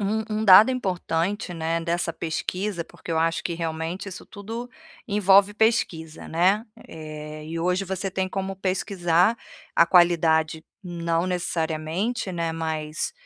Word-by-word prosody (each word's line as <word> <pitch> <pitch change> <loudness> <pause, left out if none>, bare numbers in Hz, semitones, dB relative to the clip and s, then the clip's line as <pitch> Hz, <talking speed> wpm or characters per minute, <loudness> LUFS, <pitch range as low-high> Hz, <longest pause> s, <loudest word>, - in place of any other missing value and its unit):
um 210 +2 0 0.2
um - - -1
dado 210 +5 +9
importante, 185 -4 -2
né, 165 +1 -1
dessa 170 0 -1
pesquisa, 175 +3 -3
porque 170 - -12
eu 160 - +1
acho 165 +1 +1
que 170 - -2
realmente 165 +3 -4
isso 185 - -9
tudo 225 +4 -7 0.4
envolve 200 -1 +4
pesquisa, 200 -8 0
né, 190 +6 +2 0.2
eh, 155 -1 -8 0.2
hoje 180 +3 0
você 190 +1 -3
tem 185 0 -2
como 195 0 -4
pesquisar 185 +1 +1 0.4
a 170 - +5
qualidade 160 -3 +3 0.2
não 170 -1 -1
necessariamente, 175 +5 -2
né, 170 -1 -1
mas, 155 - -3
175 Hz, 130 wpm, -24 LUFS, 165-195 Hz, 0.4 s, dado